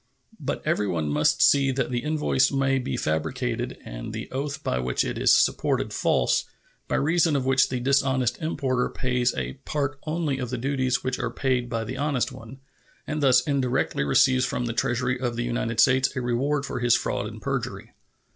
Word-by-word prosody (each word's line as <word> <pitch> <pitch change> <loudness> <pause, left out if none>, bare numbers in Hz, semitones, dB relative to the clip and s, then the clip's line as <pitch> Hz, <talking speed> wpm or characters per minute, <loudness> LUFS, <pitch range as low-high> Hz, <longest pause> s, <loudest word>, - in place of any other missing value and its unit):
But - - -3
everyone 85 -7 0
must 75 +1 +2
see 140 -1 +5
that 125 -1 -1
the 120 - 0
invoice 150 -1 +1
may 135 -1 +1
be 130 - -3
fabricated 80 -5 -2
and - - -7
the - - -6
oath 140 +2 -4
by 65 - -1
which 60 -1 0
it - - -3
is - - +4
supported - - +2
false, - - +1 0.4
by - - -1
reason 160 +1 +2
of 135 -2 0
which 130 0 +3
the 125 - -2
dishonest 130 -1 +1
importer 135 -5 -1
pays 125 -1 0
a - - -3
part 145 -1 -2
only 155 -4 -1
of 125 -2 -3
the 125 - -3
duties 130 0 0
which 130 -1 -2
are 120 - -1
paid 125 -1 -1
by 115 -2 -2
the 125 +4 -6
honest 140 -3 0
one, 125 +4 -11 0.4
and 150 0 -3
thus 130 -3 +5
indirectly 130 - 0
receives 130 - +3
from 125 -1 -1
the 115 - -2
Treasury 125 0 0
of 120 -2 -2
the 120 - -2
United 120 -1 -2
States 130 0 +4
a 130 - -1
reward 135 +4 0
for - - -4
his 120 -1 +4
fraud - - -2
and - - -9
perjury. - - -4
130 Hz, 190 wpm, -25 LUFS, 120-135 Hz, 0.4 s, see